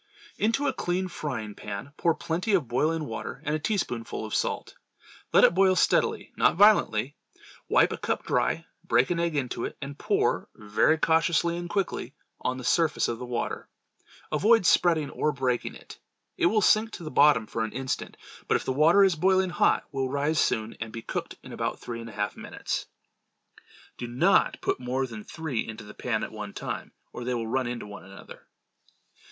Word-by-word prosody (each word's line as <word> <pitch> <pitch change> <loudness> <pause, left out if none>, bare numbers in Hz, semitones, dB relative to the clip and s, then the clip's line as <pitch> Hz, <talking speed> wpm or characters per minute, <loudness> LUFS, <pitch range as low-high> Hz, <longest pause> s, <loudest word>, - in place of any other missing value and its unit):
Into 230 +7 +1
a 270 - +1
clean 185 -1 -1
frying 125 - -5
pan, 100 +7 -7
pour 165 0 +2
plenty 170 +5 -2
of 160 -9 0
boiling 155 +6 0
water, 115 -3 -6
and 150 - 0
a - - -1
teaspoonful 125 - -2
of 110 - -7
salt. - - -1 0.6
Let - - +6
it - - +7
boil 190 +1 +4
steadily, - - +1
not - - +3
violently. 165 - +4 0.5
Wipe - - +4
a - - -3
cup - - -2
dry, 75 +7 0 0.2
break 120 +7 +2
an 170 - 0
egg 170 -2 0
into 125 -4 -2
it, - - -5
and 140 0 -7
pour, - - 0
very 105 +9 +2
cautiously 165 +1 +2
and 175 0 -5
quickly, 195 +1 -2 0.2
on 130 0 -2
the 130 - -7
surface 160 +3 +2
of 115 -1 -3
the 125 - -6
water. 120 -1 -3 0.6
Avoid 210 +7 +4
spreading 165 -5 +3
or 150 - 0
breaking 130 -3 -1
it. - - -13 0.4
It - - +3
will 215 +4 +2
sink 215 +3 +4
to 175 - -7
the 155 - -6
bottom 140 -6 +5
for 115 +1 -3
an 110 - -3
instant, 130 +1 -4 0.3
but - - +3
if - - -8
the 130 - 0
water 165 +8 +5
is 190 -3 +4
boiling 185 +2 +2
hot, 175 - +2
will 135 -2 -1
rise 145 +3 0
soon 110 +1 +1
and 110 0 -5
be 115 0 -7
cooked - - -4
in - - -10
about - - -2
three 115 -1 -6
and 115 - -8
a - - -11
half 105 0 -2
minutes. - - -4 1.1
Do 120 - -4
not 120 +2 +2
put - - -1
more 130 +1 -1
than 110 -4 -8
three 160 -5 -4
into 110 -1 -7
the 105 0 -11
pan 110 -3 -2
at - - -5
one 105 -2 -7
time, - - -5 0.2
or 120 - -6
they 125 0 -1
will 115 -1 -2
run 130 +2 -1
into 120 -2 -4
one 105 0 -10
another. 95 0 -13
140 Hz, 195 wpm, -27 LUFS, 115-170 Hz, 1.1 s, it